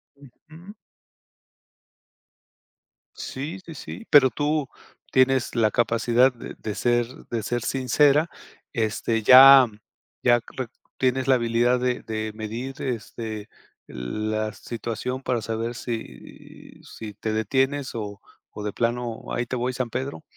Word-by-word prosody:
Ujú. 160 - -15 2.4
Sí, 150 +8 -6
sí, 165 - -9
sí, 225 +10 -8
pero 140 -3 +7
tú, 150 +1 -1 0.4
tienes 130 -1 +2
la 110 -2 +3
capacidad 120 +2 +3
de 120 - -9
de 105 -2 -4
ser 120 -1 +2 0.2
de 115 -2 -2
ser 120 +2 -2
sincera. 140 +5 +3 0.4
Este 115 -1 0
ya, 130 +2 +10 0.6
ya 120 -1 +4 0.2
re 130 -2 -2 0.3
tienes 130 0 +1
la 135 - +5
habilidad 120 +1 +2
de 125 0 -1
de 110 -1 -4
medir, 115 +5 -6
este, 110 -3 -5 0.4
la 110 - -3
situación 120 +4 -5
para 125 -3 -1
saber 115 +2 -3
si, 115 -1 -9
si 110 -2 -9
te 110 +2 -4
detienes 130 +5 0
o 105 -3 -5 0.3
o 105 - -8
de 105 -1 -3
plano: 120 -1 -2
"Ahí 120 - -1
te 125 - -4
voy, 125 +1 -1
San 125 -1 -3
Pedro". 135 +6 -4
120 Hz, 125 wpm, -24 LUFS, 110-130 Hz, 2.4 s, ya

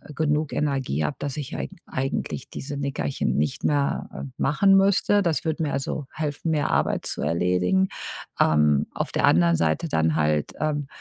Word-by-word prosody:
genug 150 0 0
Energie 135 - -1
habe, 145 - -2
dass 140 -2 -3
ich 150 0 -5
eigen - - -5
eigentlich 135 0 -3
diese 140 +1 -6
Nickerchen 140 - -2
nicht 75 0 -1
mehr, 145 -1 0
äh, - - -6
machen 195 +8 +4
müsste. 200 +1 +3
Das 165 -7 0
würde 160 0 -1
mir, 145 - -1
also, 140 +2 -3
helfen, 155 +1 -2
mehr 150 -2 +1
Arbeit - - +1
zu - - -3
erledigen. 90 - +1 0.5
Ähm, 75 -2 +3
auf - - -3
der - - +2
anderen 85 0 +4
Seite 80 - 0
dann 80 - +1
halt, 75 -1 +1
ähm, 150 -2 -1
140 Hz, 170 wpm, -24 LUFS, -, 0.5 s, machen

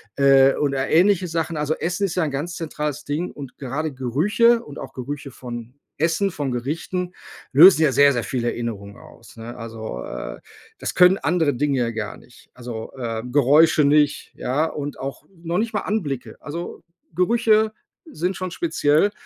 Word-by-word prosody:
äh, 135 -1 +5
oder 140 -2 -1
ähnliche 185 +2 +4
Sachen. 165 -1 -2
Also, 150 +1 0
Essen 175 +5 -1
ist 170 - -5
ja 180 - +1
ein 150 - -2
ganz 155 +6 -4
zentrales 150 -2 -4
Ding 155 +5 -2
und 140 -3 -10
gerade 145 +3 -3
Gerüche 205 - +2
und 145 - -10
auch - - -8
Gerüche 140 +2 -6
von 120 0 -8 0.2
Essen, 170 +5 +1
von 145 -4 -3
Gerichten, 165 +8 -3 0.4
lösen 160 +3 +8
ja 150 - +4
sehr 140 +1 +5
sehr 120 -3 -1
viele 120 +4 -2
Erinnerungen 100 -4 -6
aus, - - -16
ne? 115 +1 -8
Also, 110 - -6
äh, - - -7 0.4
das - - -4
können 180 +1 +6
andere 160 -2 +1
Dinge 140 +2 0
ja 120 -1 0
gar 110 -2 -5
nicht. 120 - -19
Also, 120 -3 -7
äh, 115 -3 -3
Geräusche 145 +2 +5
nicht, 145 0 +2
ja, 140 +5 0
und 145 -2 -5
auch 135 +2 -6 0.2
noch 170 +3 -1
nicht 225 0 -2
mal 210 - 0
Anblicke. 150 - -3
Also, 170 +4 -7 0.3
Gerüche 220 +3 +3 0.3
sind 185 - -3
schon 185 0 -4
speziell 160 +3 +2
145 Hz, 170 wpm, -22 LUFS, 130-170 Hz, 0.4 s, lösen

